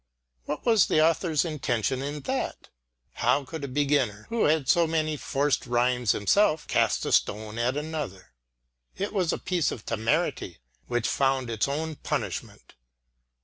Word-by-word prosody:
What 150 - -4
was 225 -5 +5
the - - +2
author's 165 -1 +1
intention 130 -5 -1
in 145 +2 -4
that? 135 - -3 0.4
How 140 0 +1
could 160 +2 -7
a - - -2
beginner 135 -6 0
who 230 -1 +1
had 150 -3 +2
so 170 -1 +4
many 155 -1 0
forced 145 -1 -1
rhymes 120 -1 +2
himself, 155 - +2
cast - - +1
a - - -2
stone 110 +2 0
at 125 +4 0
another? 150 - -5 0.6
It 200 +2 -3
was 185 -5 +1
a - - -1
piece 180 -4 0
of 110 - -7
temerity 115 - -1 0.3
which 120 -2 0
found 135 -3 +1
its 110 +2 0
own 155 +2 -3
punishment. - - -4
145 Hz, 150 wpm, -27 LUFS, 120-160 Hz, 0.6 s, was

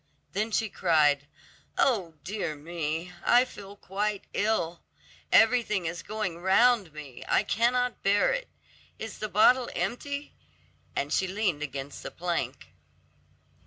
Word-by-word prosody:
Then 215 +3 0
she 220 0 +1
cried, 150 -7 +2 0.5
"Oh, 195 -11 +2
dear 190 -5 -3
me; 165 +2 -4
I 245 +1 +5
feel 200 -4 -11
quite 205 +1 -2
ill: 200 -6 0 0.5
everything 220 -5 +4
is 170 +1 -3
going 210 -6 -4
round 195 +1 +4
me, 145 -4 -9
I - - +3
cannot 245 +2 +1
bear 200 - +3
it. - - -4 0.5
Is 220 -1 -7
the 215 - -3
bottle 245 +5 +5
empty?" 285 +4 -3 0.6
and 140 +1 -1
she 190 - +2
leaned 185 -5 -1
against 140 -1 -5
the - - -6
plank. 135 - -3
195 Hz, 125 wpm, -28 LUFS, 160-220 Hz, 0.6 s, I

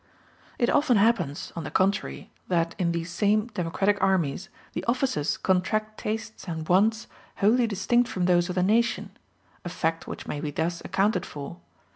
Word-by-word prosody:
It 240 - +2
often 275 -6 +3
happens, 200 -9 +1
on 165 - -4
the - - -5
contrary, 195 +2 0 0.2
that 170 -2 +1
in 170 -2 +1
these 170 0 -3
same 210 +5 +1
democratic 195 +2 0
armies 185 0 +1 0.2
the - - -3
officers 255 - 0
contract 215 +4 0
tastes 220 0 -5
and 160 -2 -4
wants 215 +5 +3 0.3
wholly 230 +4 +3
distinct 225 +4 +1
from 180 -2 -1
those 175 0 +3
of 180 - -3
the 180 - +2
nation 230 +4 +1 0.5
a 175 - -4
fact 165 -1 -2
which - - -7
may 145 - -4
be 150 - -2
thus 165 +3 -2
accounted 195 -2 +1
for. 140 - -8
190 Hz, 165 wpm, -26 LUFS, 170-215 Hz, 0.5 s, often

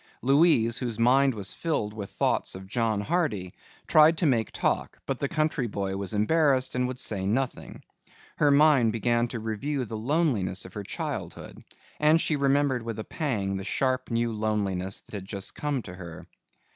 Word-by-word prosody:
Louise, 130 -5 +4
whose 120 -4 -3
mind 130 +2 +4
was 100 -2 -4
filled 130 -11 -2
with 105 -2 -6
thoughts - - 0
of 95 0 -8
John 110 0 0
Hardy, 105 - -1 0.3
tried 155 +1 +6
to 170 - 0
make 120 -6 +1
talk - - -1
but 135 - -3
the 140 - -1
country 155 -5 0
boy 100 -2 -3
was 100 -1 -4
embarrassed 130 +3 +2
and 125 0 0
would 130 0 -5
say 105 -7 -2
nothing. 125 +5 -2 0.5
Her 145 - +4
mind 140 -6 +5
began 120 +1 +1
to 120 -1 -5
review 125 +5 -2
the 110 - -6
loneliness 115 - 0
of 95 - -11
her 105 - -5
childhood - - -6 0.4
and 155 +2 +5
she 160 - 0
remembered 140 -2 +2
with 115 -1 -5
a 110 - -4
pang 105 - -2
the 95 - -5
sharp 130 +5 -1
new 115 -1 0
loneliness 100 -3 -1
that - - -21
had 100 -3 -5
just 100 -1 -4
come 145 -5 -2
to 90 - -9
her. 85 -3 -9
120 Hz, 180 wpm, -27 LUFS, 105-140 Hz, 0.5 s, tried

